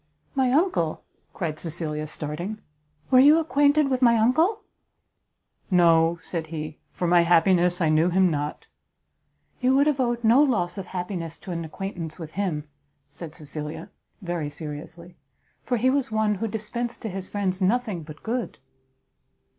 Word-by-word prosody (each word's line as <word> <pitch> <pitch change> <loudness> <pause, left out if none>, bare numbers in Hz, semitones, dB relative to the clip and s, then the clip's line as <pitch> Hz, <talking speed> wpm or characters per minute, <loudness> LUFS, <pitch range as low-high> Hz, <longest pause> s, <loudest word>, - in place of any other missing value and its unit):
"My 260 -2 +2
uncle?" 270 - +1 0.3
cried 155 -4 -4
Cecilia, 155 -2 -3
starting, 155 +8 -5 0.5
"were 255 - +7
you 290 +4 +7
acquainted 290 -2 +3
with 255 0 0
my 235 -2 +5
uncle?" 320 - +2 1.1
"No," 170 -2 +4
said 165 -3 -4
he, 155 -1 -6
"for 180 - -3
my 175 0 +5
happiness 175 +1 +3
I 160 - +3
knew 155 +3 +3
him 185 0 +3
not." 145 0 -3 0.9
"You 255 +1 +3
would 280 +1 +4
have 300 -3 +1
owed 240 -2 0
no 230 +5 +6
loss 205 -10 +1
of 190 - -7
happiness 175 -3 -4
to 185 - -9
an 170 -1 -3
acquaintance 165 -1 -6
with 160 -3 -8
him," 165 -6 -2 0.4
said 165 -2 -8
Cecilia, 150 +1 -7 0.3
very 170 -4 -3
seriously, 160 +3 -9 0.5
"for 245 - 0
he 255 +3 +3
was 275 -4 0
one 215 -1 +2
who 215 +3 -2
dispensed 225 +3 -4
to 220 - -3
his 190 0 -6
friends 195 -2 -2
nothing 210 -2 +1
but 155 -1 -12
good." 240 +1 -3
185 Hz, 155 wpm, -25 LUFS, 165-240 Hz, 1.1 s, were